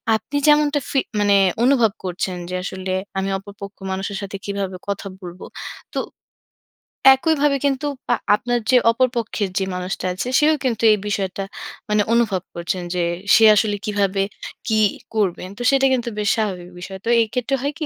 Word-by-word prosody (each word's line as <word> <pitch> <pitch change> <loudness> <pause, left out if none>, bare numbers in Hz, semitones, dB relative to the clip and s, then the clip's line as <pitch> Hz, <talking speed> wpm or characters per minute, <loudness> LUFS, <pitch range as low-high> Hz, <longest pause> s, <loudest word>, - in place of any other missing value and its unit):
আপনি 270 +6 -3
যেমনটা 295 -1 +4
ফি 270 - +2 0.2
মানে 205 -1 +4 0.3
অনুভব 245 -4 +4
করছেন 180 0 -3
যে, 185 - -3
আসলে, 190 0 -4 0.3
"আমি 195 +1 -1
অপরপক্ষ 200 0 -11
মানুষের 195 +1 -3
সাথে 200 0 -5
কিভাবে 200 -2 -3
কথা 200 0 -3
বলব?" 180 0 -9 0.5
তো - - +1 1.2
একইভাবে 295 -1 +2
কিন্তু 280 +1 0 0.3
আ - - +4 0.2
আপনার 245 +3 -1
যে 255 - +7
অপর 255 +3 +2
পক্ষের 215 -3 -2
যে 190 - 0
মানুষটা 180 +1 -4
আছে, 185 +7 -4
সেও 305 +1 +4
কিন্তু 235 -4 -1
এই - - +1
বিষয়টা 195 -1 -2 0.5
মানে 210 0 +3
অনুভব 220 -6 +2
করছেন 175 +1 -3
যে, 175 - +1 0.3
সে 225 - +5
আসলে 210 0 +2
কিভাবে, 200 -2 +1 0.4
কি 220 -1 +2 0.4
করবেন? 185 -3 0
তো - - -7
সেটা 270 0 +3
কিন্তু 240 -2 -1
বেশ 210 0 +1
স্বাভাবিক 185 -5 -2
বিষয়। 190 +1 -7
তো - - -1
এক্ষেত্রে 250 +4 -1
হয় 285 +1 -1
কি? 310 - -2
205 Hz, 165 wpm, -21 LUFS, 190-250 Hz, 1.2 s, যে